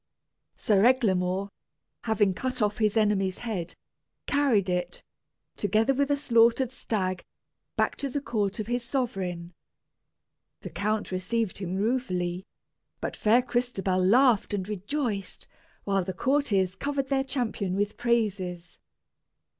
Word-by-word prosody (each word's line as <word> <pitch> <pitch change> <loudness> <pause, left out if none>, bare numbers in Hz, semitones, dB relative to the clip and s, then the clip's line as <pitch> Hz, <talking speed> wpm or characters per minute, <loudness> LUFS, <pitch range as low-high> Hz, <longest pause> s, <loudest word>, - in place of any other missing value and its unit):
Sir 200 -2 +3
Eglamour, 195 -6 +2 0.5
having 215 -4 +2
cut 255 +6 -3
off 210 0 0
his 215 0 +2
enemy's 200 -3 +2
head, 195 -8 -4 0.5
carried 270 -9 +2
it, 180 -1 -2 0.5
together 215 +6 +2
with 280 +1 +1
the 285 - +2
slaughtered 235 -2 +3
stag, 185 -7 -2 0.5
back - - +1
to 280 - -3
the 285 - -2
court 210 -6 -2
of 215 - -2
his 240 +2 -1
sovereign. 190 -9 -3 1.1
The - - -8
count 210 0 -1
received 195 +3 -1
him 185 -2 -3
ruefully; 190 -5 -1 0.5
but - - -4
fair 230 +4 +3
Crystabell 240 -7 0
laughed 230 +1 +4
and 190 -2 -3
rejoiced, 210 0 -3 0.4
while 195 -2 +1
the 185 - -4
courtiers 205 -5 +1
covered 275 +3 -2
their 270 -1 +2
champion 225 -8 -2
with 205 +1 -1
praises. 200 -7 -1
210 Hz, 125 wpm, -27 LUFS, 190-245 Hz, 1.1 s, laughed